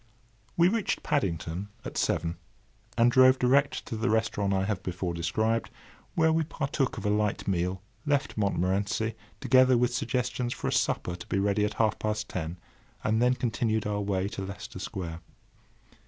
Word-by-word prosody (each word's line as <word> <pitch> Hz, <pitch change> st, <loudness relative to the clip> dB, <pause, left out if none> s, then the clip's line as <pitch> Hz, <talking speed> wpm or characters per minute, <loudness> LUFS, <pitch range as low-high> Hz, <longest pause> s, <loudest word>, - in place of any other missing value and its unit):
We 170 Hz, 0 st, +6 dB
reached 215 Hz, +1 st, 0 dB
Paddington 85 Hz, -, -1 dB, 0.2 s
at -, -, -6 dB
seven, 85 Hz, 0 st, 0 dB, 0.6 s
and 120 Hz, +1 st, +5 dB
drove 130 Hz, +1 st, +6 dB
direct 135 Hz, +3 st, +2 dB
to 115 Hz, -, -5 dB
the 110 Hz, +3 st, 0 dB
restaurant 110 Hz, -2 st, +1 dB
I 95 Hz, -1 st, +2 dB
have 100 Hz, -3 st, -2 dB
before 90 Hz, -1 st, -3 dB
described, 110 Hz, +7 st, 0 dB, 0.5 s
where 160 Hz, -1 st, +4 dB
we 160 Hz, -, +2 dB
partook 140 Hz, -3 st, -2 dB
of -, -, -5 dB
a -, -, +2 dB
light 105 Hz, -1 st, 0 dB
meal, 90 Hz, 0 st, -1 dB, 0.2 s
left 145 Hz, -2 st, 0 dB
Montmorency, 100 Hz, +2 st, 0 dB, 0.3 s
together 130 Hz, -1 st, +5 dB
with 125 Hz, 0 st, +2 dB
suggestions 125 Hz, -1 st, -1 dB
for -, -, -4 dB
a -, -, 0 dB
supper 90 Hz, -, 0 dB
to 85 Hz, -, -10 dB
be -, -, -1 dB
ready 100 Hz, +1 st, +2 dB
at 105 Hz, -, -3 dB
half 110 Hz, -1 st, +1 dB
past 105 Hz, -1 st, -2 dB
ten, 85 Hz, 0 st, -4 dB, 0.5 s
and 110 Hz, +1 st, +2 dB
then 125 Hz, +1 st, +4 dB
continued 115 Hz, -3 st, 0 dB
our 105 Hz, 0 st, -1 dB
way 100 Hz, -1 st, 0 dB
to 100 Hz, -, -6 dB
Leicester 95 Hz, -1 st, -7 dB
Square. 85 Hz, -4 st, -5 dB
110 Hz, 170 wpm, -28 LUFS, 95-125 Hz, 0.6 s, We